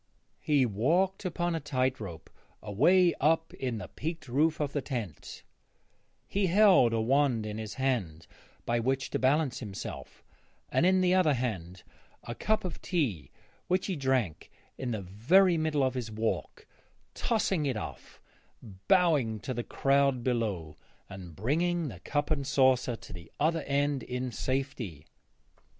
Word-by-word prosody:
He 145 -4 +2
walked 165 - +1
upon 175 -1 -1
a 165 - -1
tight 130 -3 -1
rope 85 -7 -8 0.3
away 170 - +4
up 160 +3 +2
in 125 -4 -3
the 100 -4 -6
peaked 160 - -6
roof 150 +6 +1
of 145 -2 -2
the 145 - -1
tent; 120 - -6 0.8
he 195 -1 0
held 185 - +5
a 115 - 0
wand 125 -1 +2
in 105 0 -5
his 110 -1 -6
hand 110 -12 -1 0.4
by 120 0 +1
which 130 +3 -1
to - - -1
balance 135 +1 +2
himself 105 -5 -8 0.5
and 175 - +3
in 185 0 +4
the 180 0 +3
other 170 -6 +4
hand 95 -8 -4 0.4
a 120 - -5
cup 215 - 0
of 180 - -5
tea 115 - -1 0.4
which 185 +1 +1
he 190 - -2
drank 130 - -1 0.3
in 130 - -4
the 110 -4 -3
very 165 - +4
middle 155 -3 +1
of 130 -1 +1
his 125 -3 -4
walk; 110 +1 -3 0.5
tossing 195 -9 0
it 130 -5 -1
off, - - -8 0.7
bowing 155 - +3
to 130 - -4
the 120 0 -3
crowd 135 -2 +1
below, 105 - -2 0.3
and 90 -4 -9
bringing 165 - 0
the 95 -7 -10
cup 145 - -2
and 140 -3 0
saucer 130 -3 +3
to - - -12
the 85 -1 -11
other 160 +2 +2
end 140 0 +1
in 125 0 -4
safety. 120 - -3
130 Hz, 155 wpm, -29 LUFS, 110-160 Hz, 0.8 s, held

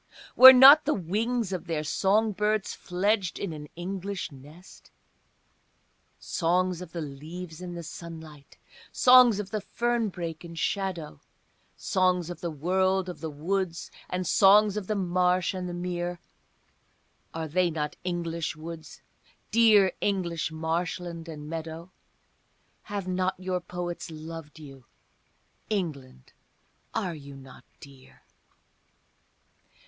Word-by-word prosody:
Were 260 +1 +12
not 265 +4 +9
the 300 - +1
wings 210 +4 -1
of 180 - -5
their 160 -2 -2
song 205 +8 +1
birds 210 0 -1
fledged 190 +1 -1
in 195 -5 -4
an 150 -1 -8
English 190 +1 -5
nest? 150 +7 -15 1.3
Songs 180 +1 0
of 180 -3 -9
the 170 - -5
leaves 160 +4 -8
in 175 -1 -7
the 170 - -6
sunlight, 160 -3 -11 0.3
songs 250 -4 +6
of 200 -2 -6
the 215 - -2
fern 240 +1 -1
brake 170 -3 -6
in 170 -1 -10
shadow, 170 - -3 0.6
Songs 180 -2 0
of 175 - -9
the 170 - -2
world 185 +4 0
of 180 - -8
the 160 - -5
woods 170 +3 -3 0.2
and 180 0 -2
songs 205 +3 +5
of 210 -3 -4
the 215 - -1
marsh 180 -1 +1
and 180 -1 -4
the - - -4
mere, 175 0 -4 1.1
Are 160 0 -4
they 180 +3 +1
not 150 -2 -3
English 170 -3 -3
woods, 160 0 -10 0.5
dear 215 -4 +5
English 175 -5 -1
marshland 165 +1 -3
and 150 -2 -8
meadow? 165 +2 -7 1.0
Have 200 -2 -4
not 185 0 -1
your 185 -1 -2
poets 175 -1 -6
loved 160 -1 -9
you? 135 -5 -13 0.8
England, 145 - -4 0.6
are 180 - -2
you 140 -3 -11
not 135 -1 -14
dear? 135 -2 -16
175 Hz, 125 wpm, -27 LUFS, 160-190 Hz, 1.3 s, Were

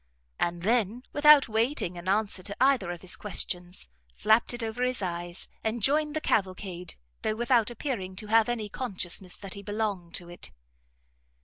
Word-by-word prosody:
and 170 0 -1
then, 230 +2 +1
without 295 -1 +7
waiting 225 -4 0
an 175 +1 -8
answer 205 -1 +1
to 200 +2 -5
either 260 -8 +3
of 175 -1 -5
his 185 - +2
questions, 180 - -1 0.3
flapped 220 +2 +3
it 240 -1 -4
over 225 +2 -4
his 250 0 +1
eyes, 175 0 -4 0.2
and 220 0 -2
joined 300 +3 +2
the - - +1
cavalcade, 185 - -2 0.3
though 215 - 0
without 235 -1 +3
appearing 230 -7 -4
to 215 - -5
have 225 +1 +4
any 230 -3 -2
consciousness 190 -5 -3
that 195 -2 -8
he 200 - -7
belonged 205 -4 -3
to 175 - -6
it. 175 0 -9
210 Hz, 170 wpm, -28 LUFS, 185-240 Hz, 0.3 s, without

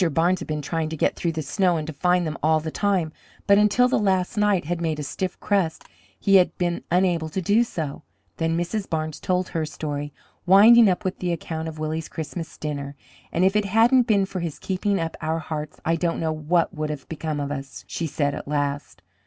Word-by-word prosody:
Barnes 175 +4 +2
had - - -7
been 150 -1 -3
trying 160 +1 -2
to 160 - -5
get - - +1
through 170 -1 -2
the 160 -1 -3
snow 175 +5 +1
and 155 - -3
to 160 - -6
find 180 +4 +2
them 155 -1 -3
all 155 +1 +3
the 160 0 -5
time, 190 -5 0 0.3
but 200 0 +5
until 210 +4 +4
the 250 - +1
last 190 -1 +1
night 205 -5 +2
had 170 +1 -2
made 160 -2 -1
a 150 - -4
stiff 185 +5 -4
crust 190 -6 0 0.4
he 195 -1 +5
had 180 - +2
been 175 -1 -1
unable 175 -3 +1
to 175 - -3
do 205 +6 +3
so. 155 -11 -5 0.4
Then 165 0 0
Mrs. 190 +4 -2
Barnes 155 -1 -2
told 185 0 -1
her 165 -2 -2
story, 145 -1 -4 0.4
winding 215 +4 +8
up 185 +3 -1
with 185 - -2
the 180 -1 -1
account 160 -1 -4
of 160 -1 -7
Willie's 155 +1 -3
Christmas 160 +1 -6
dinner. 140 -2 -5 0.4
"And 175 +3 +2
if 190 +2 +2
it 210 -1 +2
hadn't 230 +5 +4
been 200 -4 +3
for 190 -1 -5
his 170 -4 -4
keeping 195 +1 -1
up 165 -1 -3
our 160 +1 -1
hearts 155 -2 -5
I 165 +1 +2
don't 170 0 -1
know 160 -1 0
what 165 +4 +1
would 155 -2 -3
have 150 -3 -6
become 155 -2 -4
of 140 0 -3
us," 135 -1 -6
she 165 - -3
said 145 -1 -1
at 145 - -7
last. 145 -7 -3
165 Hz, 225 wpm, -24 LUFS, 155-190 Hz, 0.4 s, winding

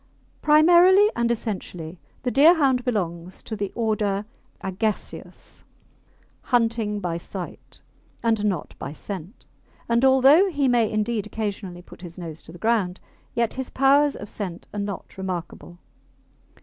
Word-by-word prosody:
Primarily 350 +7 +6
and 235 0 +1
essentially 185 -7 -4 0.2
the 250 - 0
Deerhound 275 -3 +5
belongs 180 -7 -3
to 220 - -5
the 200 -2 -3
order 210 -3 0 0.4
Agaseus, 200 +3 -4 0.8
hunting 230 -4 +1
by 170 -3 -3
sight 180 +1 -9 0.4
and 225 -2 +1
not 190 -7 -2
by - - -6
scent, 190 - -8 0.4
and 235 +1 +2
although 270 +8 +6
he 285 -6 0
may 235 -3 +3
indeed 215 0 -1
occasionally 200 -5 -5
put - - -15
his 175 -2 -10
nose 165 -3 -7
to - - -12
the 175 - -11
ground, 205 -4 0 0.4
yet 235 -1 +1
his 265 -1 -4
powers 280 +2 +3
of 205 - -8
scent 190 -4 -6
are 210 - -4
not 200 -1 -6
remarkable. 175 -1 -6
215 Hz, 135 wpm, -24 LUFS, 185-250 Hz, 0.8 s, Primarily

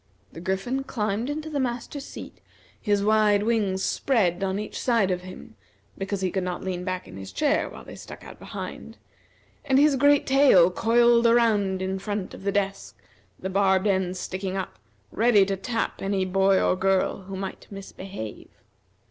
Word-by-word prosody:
The 165 - -9
Griffin 220 +9 -2
climbed 220 -1 -2
into 305 +2 -4
the 300 -2 -2
master's 255 +2 -3
seat, - - -10 0.4
his 205 -2 +1
wide 210 -1 +3
wings 210 -4 0
spread 195 -9 +1
on 190 0 -1
each 210 +1 -5
side 230 -6 +2
of 180 0 -1
him, 185 0 -11 0.4
because 195 0 -4
he 185 -1 0
could 190 - -1
not 180 -1 -4
lean 180 -1 -3
back 185 0 -4
in - - -11
his 95 0 -8
chair 300 0 +1
while - - -11
they - - -10
stuck - - -11
out - - -12
behind, - - -8 0.7
and 265 - +2
his 290 0 +5
great 285 +2 +4
tail 265 -11 +5
coiled 235 +3 +4
around, 210 -5 +2
in 190 0 -2
front 205 -1 -4
of - - -10
the 200 +1 -1
desk, 195 -1 -2 0.4
the - - -5
barbed 190 0 +2
end 190 -2 0
sticking 185 +1 -4
up, 190 - -5 0.3
ready 220 -3 +4
to 195 0 -1
tap 225 +4 -3
any 195 -1 0
boy 190 +1 +3
or - - +2
girl 190 +1 +1
who 195 0 -7
might 190 0 -6
misbehave. 195 - -8
195 Hz, 175 wpm, -25 LUFS, 190-235 Hz, 0.7 s, his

